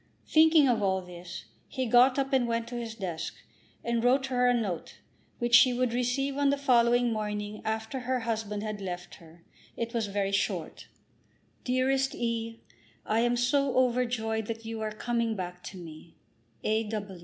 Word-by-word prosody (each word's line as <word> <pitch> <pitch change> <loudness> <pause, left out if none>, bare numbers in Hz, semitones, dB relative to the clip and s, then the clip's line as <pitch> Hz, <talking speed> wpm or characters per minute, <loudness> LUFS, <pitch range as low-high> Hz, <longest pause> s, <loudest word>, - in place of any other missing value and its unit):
Thinking 315 -2 +6
of 235 -4 +2
all 190 -1 +1
this, 175 0 -9 0.2
he 260 -2 -3
got 250 +3 +5
up, 270 0 -1
and 255 -3 +3
went 230 0 -1
to 245 - -6
his 230 -2 -5
desk, 180 -6 -4 0.5
and 235 0 0
wrote 260 +2 +3
her 250 0 +3
a - - +5
note, 210 -9 -2 0.4
which 240 0 -2
she 255 +1 +8
would 245 -1 0
receive 260 +3 0
on 285 -1 +3
the 280 - +2
following 245 -3 +3
morning 210 -1 -4
after 220 +4 -3
her 255 0 -1
husband 215 -2 -3
had 215 -1 -4
left 180 -2 -6
her. 165 +1 -17 0.3
It 230 0 -3
was 230 -3 0
very 200 0 -1
short. 195 - -2 0.8
DEAREST 265 +1 +1
E. 230 -1 -3 0.4
I 220 - +1
am 240 +1 +2
so 270 +2 +1
overjoyed 240 -3 +1
that 225 0 -5
you 225 0 -5
are 215 0 -2
coming 230 +1 -1
back 180 -2 -6
to 190 - -8
me. 165 -1 -11 0.5
A. 220 0 0
230 Hz, 170 wpm, -29 LUFS, 210-250 Hz, 0.8 s, she